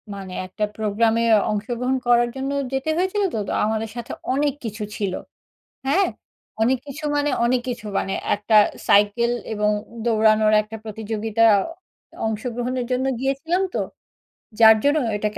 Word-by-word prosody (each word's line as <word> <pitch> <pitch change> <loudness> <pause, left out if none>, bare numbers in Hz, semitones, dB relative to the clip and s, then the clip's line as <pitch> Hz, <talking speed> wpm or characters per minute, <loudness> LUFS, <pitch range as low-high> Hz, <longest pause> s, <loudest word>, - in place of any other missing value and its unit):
মানে 190 -2 -8
একটা 210 +3 -4
প্রোগ্রামে 220 +2 +1 0.3
অংশগ্রহণ 240 +5 -1
করার 240 0 +4
জন্য 270 +1 -3 0.2
যেতে 270 +4 -1
হয়েছিল 380 +3 0
তো। 220 - -1
তো - - -3
আমাদের 220 0 -1
সাথে 240 - -6 0.2
অনেক 285 0 +1
কিছু 215 -1 -5
ছিল, 195 -3 -2 0.7
হ্যাঁ? 380 +8 +3 0.5
অনেক 250 +4 +3
কিছু 300 +3 -8
মানে 290 0 +1 0.2
অনেক 250 +1 +2
কিছু। 235 -3 -5
মানে 195 - -3 0.2
একটা 210 +2 0 0.3
সাইকেল 210 +4 +4 0.2
এবং 210 0 +1 0.4
দৌড়ানোর 215 -1 +4
একটা 215 +1 -9
প্রতিযোগিতা 220 +1 -2 0.8
অংশগ্রহণের 245 +3 -3
জন্য 255 +1 0
গিয়েছিলাম 275 +8 0
তো। - - +1 0.8
যার 220 -1 +8
জন্য 290 +2 +3 0.2
এটাকে 210 0 -3
230 Hz, 135 wpm, -22 LUFS, 215-265 Hz, 0.8 s, যার